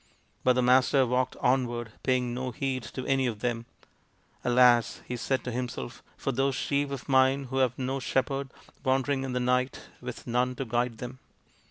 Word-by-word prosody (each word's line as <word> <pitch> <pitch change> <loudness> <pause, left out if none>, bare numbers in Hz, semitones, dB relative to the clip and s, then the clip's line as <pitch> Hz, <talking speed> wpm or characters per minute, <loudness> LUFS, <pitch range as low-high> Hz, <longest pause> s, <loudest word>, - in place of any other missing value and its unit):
But 130 - +5
the 125 0 +1
Master 130 +2 +5
walked 125 +1 0
onward, 120 -3 +1
paying 125 -2 +1
no 130 +1 -3
heed 130 +1 -2
to 130 - -4
any 135 -1 +2
of 110 -3 -4
them. 120 -1 -2 0.4
" - - -37
Alas! 120 -1 +4
" - - -25
he 125 - -3
said 130 +2 -1
to 125 - -4
himself, 120 - -4
" - - -32
for 135 - -1
those 135 +1 +1
sheep 140 +2 0
of 135 -4 -6
mine 130 +1 +4
who 135 - -1
have 130 -2 +2
no 135 +1 -2
shepherd, 135 +2 -1 0.3
wandering 135 +1 +1
in 130 -1 -3
the 125 - 0
night 125 +1 0
with - - -7
none 125 +1 0
to 135 - -3
guide 120 0 -1
them 125 +2 -7
125 Hz, 195 wpm, -28 LUFS, 125-135 Hz, 0.4 s, But